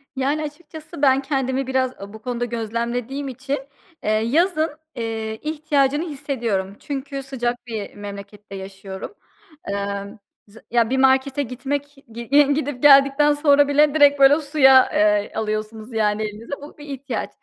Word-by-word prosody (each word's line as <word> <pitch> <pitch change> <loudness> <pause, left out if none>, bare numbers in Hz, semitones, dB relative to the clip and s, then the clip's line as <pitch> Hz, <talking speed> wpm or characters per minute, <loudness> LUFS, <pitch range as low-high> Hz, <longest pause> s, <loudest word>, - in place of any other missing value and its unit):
Yani, 280 +4 0
açıkçası 310 +1 -9
ben 270 -1 +4
kendimi 270 -1 -1
biraz 260 -1 +1
o 200 +1 -9
bu 220 - -11
konuda 245 0 -3
gözlemlediğim 235 +4 -3
için, 270 +2 -4 0.4
eee, - - -1
yazın, 310 - +2 0.3
eee, 225 -1 -4
ihtiyacını 300 -1 0
hissediyorum 235 -10 -3
çünkü 275 -1 -5
sıcak 245 -3 -3
bir 220 -3 -6
memlekette 200 0 -9
yaşıyorum. 195 - -8 0.5
Emm, 200 0 -4 0.3
z 205 +2 -18
ya, 235 -1 +2
bir 265 - 0
markete 265 +1 +3
gitmek 280 +3 -4 0.2
gi 235 +1 -8 0.3
gidip 285 -4 -3
geldikten 275 +1 +6
sonra 290 -1 +4
bile 290 0 +3
direkt 290 -2 +5
böyle 275 +2 +6
suya, 270 -3 +5
eee, 210 0 +2
alıyorsunuz 215 +1 -4
yani 215 -1 +1
elinize, 215 +5 -6
bu 290 - -12
bir 295 - -11
ihtiyaç 270 -4 -5
260 Hz, 140 wpm, -22 LUFS, 220-285 Hz, 0.5 s, geldikten